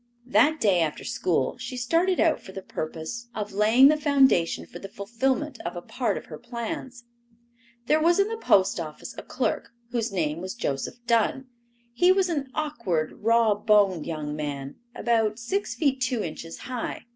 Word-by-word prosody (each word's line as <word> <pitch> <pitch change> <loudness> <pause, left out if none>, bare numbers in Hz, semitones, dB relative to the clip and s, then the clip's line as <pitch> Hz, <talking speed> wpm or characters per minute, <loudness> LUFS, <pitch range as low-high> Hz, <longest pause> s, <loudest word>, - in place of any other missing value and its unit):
That 305 +5 +3
day 200 -7 +3
after 160 -3 -1
school - - -1
she 255 - -6
started 335 +9 +1
out 325 - +3
for 190 - -12
the 190 - -7
purpose 160 +11 -5
of 210 -1 -4
laying 220 +6 +6
the 305 +1 +4
foundation 270 - +3
for 175 - -10
the 195 - -8
fulfillment 255 +7 -2
of 170 +1 -4
a 175 - -5
part 250 -3 -1
of - - -7
her - - -9
plans. 240 +1 -6 0.8
There 305 +5 +3
was 340 +2 +4
in 395 - +4
the 450 - -3
post 195 - +3
office 155 -2 -7
a - - -6
clerk - - -2 0.2
whose 235 -2 -1
name 165 -3 -1
was 185 +4 -5
Joseph 235 - -4
Dunn. 240 +3 +1 0.4
He 355 +9 +5
was 375 -1 +2
an 285 -5 -2
awkward, 190 - -1
rawboned 210 -5 +3
young 150 -2 -4
man, 145 -2 -5 0.2
about 225 -2 +1
six 380 - -2
feet 275 -5 +1
two 255 -3 0
inches 165 0 -6
high. 250 -2 -5
230 Hz, 170 wpm, -26 LUFS, 185-270 Hz, 0.8 s, laying